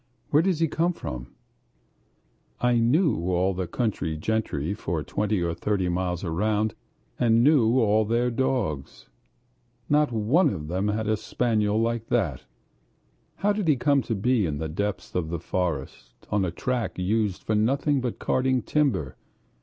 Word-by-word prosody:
"Where 150 - +5
does 180 -2 +1
he 165 - +3
come 170 +4 0
from?" 60 - -6 1.3
I 125 -1 +3
knew 135 - +3
all 90 +2 +1
the 90 -1 -3
country 95 -10 -2
gentry 85 -4 -1
for 85 -6 -3
twenty 105 0 -1
or 85 -1 -1
thirty 95 +1 -1
miles 90 0 -2
round, 105 +5 0 0.5
and 115 -1 +4
knew 130 -4 +4
all 110 -1 +3
their 120 +3 +1
dogs. 115 - -2 0.8
Not 150 -2 +3
one 125 - +3
of 75 - -5
them 95 +4 -1
had 110 +1 -1
a 110 - +2
spaniel 110 -1 0
like 115 0 -1
that. 90 - -1 0.9
How 205 +1 +1
did 205 -4 -2
he 150 - +5
come 140 +2 +2
to 115 - -3
be 110 -1 +1
in 75 -2 -3
the 80 +1 -3
depths 100 +5 -3
of 85 -3 -1
the 85 - -2
forest, 70 -9 -4
on 100 -2 +2
a - - -1
track 120 +7 -2
used 100 +1 0
for 110 - -1
nothing 135 +6 +2
but 125 -2 -3
carting 130 -1 +1
timber? 110 - 0
110 Hz, 160 wpm, -26 LUFS, 90-125 Hz, 1.3 s, Where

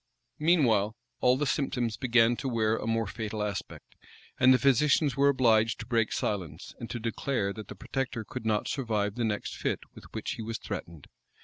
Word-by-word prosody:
Meanwhile, 120 - +3 0.2
all 125 +1 +4
the 150 - 0
symptoms 125 -5 -1
began 120 -2 +3
to 135 - -3
wear 110 -2 +1
a 115 - -4
more 115 0 +1
fatal 105 +1 -4
aspect; 100 -1 -6 0.4
and 130 0 +7
the 130 - +7
physicians 140 +1 +3
were 140 +1 +4
obliged 115 -4 +3
to - - -6
break 115 -3 +1
silence, 90 -5 -3
and 115 - -6
to 120 - -4
declare 115 -2 -1
that 110 -2 -8
the - - -8
protector 125 -2 -3
could 110 - -7
not 110 -1 0
survive 110 -7 -1
the 120 +1 -2
next 110 -2 -2
fit - - -2
with - - -13
which - - -4
he - - -5
was 110 +1 -4
threatened. 85 -4 -7
115 Hz, 190 wpm, -29 LUFS, 110-130 Hz, 0.4 s, and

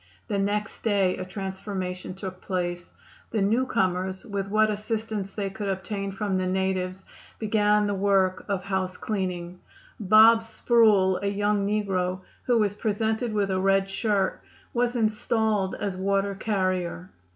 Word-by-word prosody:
The 200 -2 -1
next 205 +2 -2
day 200 -4 +2
a 185 - -4
transformation 190 -1 -5
took 190 -1 -7
place. 175 -2 -3 0.4
The 215 -3 0
new 230 +6 +2
comers, 185 -2 0
with 200 -1 -3
what 215 +1 +3
assistance 215 -1 -3
they 195 -1 -4
could 205 +1 -5
obtain 195 +1 -3
from 195 -1 -1
the 185 - -1
natives, 190 0 -1 0.3
began 210 -1 +2
the 205 - 0
work 195 -1 +2
of 195 -2 -1
housecleaning. 185 -2 -3 0.4
"Bob" 220 +3 +7
Sproul, 220 -5 +3
a 200 - -1
young 205 0 +1
negro, 190 -3 -1 0.2
who 245 -2 +3
was 210 -3 +2
presented 220 +2 -1
with 205 -2 0
a 185 - +1
red 195 0 +3
shirt, 195 -1 0 0.3
was 245 0 +1
installed 215 -3 +1
as 200 -2 -3
water 195 +1 0
carrier. 185 - -2
195 Hz, 140 wpm, -26 LUFS, 185-215 Hz, 0.4 s, Bob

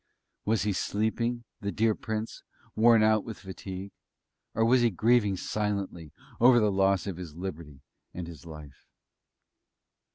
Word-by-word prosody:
Was 110 -1 +1
he 105 -1 0
sleeping, 115 +5 -1 0.2
the 100 -2 -3
dear 110 +1 +2
Prince, 110 +1 -5 0.3
worn 115 0 +6
out 110 -1 +3
with 110 -3 -7
fatigue? 95 0 -8 0.6
Or 115 - +3
was 125 +2 +4
he 120 - +4
grieving 110 0 +2
silently 100 -6 -3 0.3
over 120 +1 +7
the 105 -2 +2
loss 95 -2 +2
of 95 -4 -4
his 85 -4 -8
liberty, 85 -6 -7 0.3
and 90 - -6
his 85 -4 -10
life? 75 -4 -12
100 Hz, 140 wpm, -28 LUFS, 90-110 Hz, 0.6 s, over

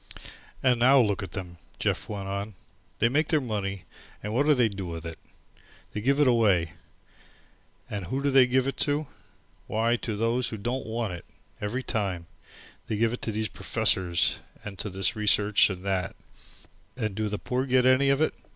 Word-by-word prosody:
"And 125 -2 +3
now 135 +3 +6
look 105 -4 +2
at 100 +2 -6
'em," 90 -2 -6 0.2
Jeff - - -1
went 100 -2 -4
on. 100 +1 -4 0.4
"They 115 - +3
make 145 +6 +1
their 155 - +3
money 100 -7 -3 0.4
and 105 +1 -3
what 140 +5 +2
do 150 - +6
they 125 -3 +4
do 100 -3 -5
with 85 -1 -6
it? 80 -1 -7 0.7
They 105 - -3
give 135 +5 +2
it 145 - +5
away. 100 -9 +3 1.1
And 100 -4 -5
who 130 - -2
do 140 - +2
they 130 -2 +6
give 130 +1 +2
it 135 -2 -2
to? 145 +1 +1 0.6
Why, 115 +2 +1
to 110 -3 -4
those 115 +3 0
as 110 - -4
don't 120 +5 -3
want 110 -3 -2
it, 85 - -8 0.4
every 115 +6 -2
time. 95 -9 -2 0.6
They 110 - -1
give 115 +1 +2
it 125 - -5
to 110 - -2
these 110 +1 -1
professors 95 -8 +1 0.3
and 100 -3 -7
to 105 - -3
this 95 +1 0
research 105 -1 +4
and 95 -1 -6
that, 95 -3 -1 0.8
and 110 -5 -2
do 110 +1 -2
the 105 - -2
poor 130 +5 -2
get 130 -1 +3
any 130 +2 +5
of 140 +2 +2
it? 155 - +2
110 Hz, 190 wpm, -27 LUFS, 100-125 Hz, 1.1 s, now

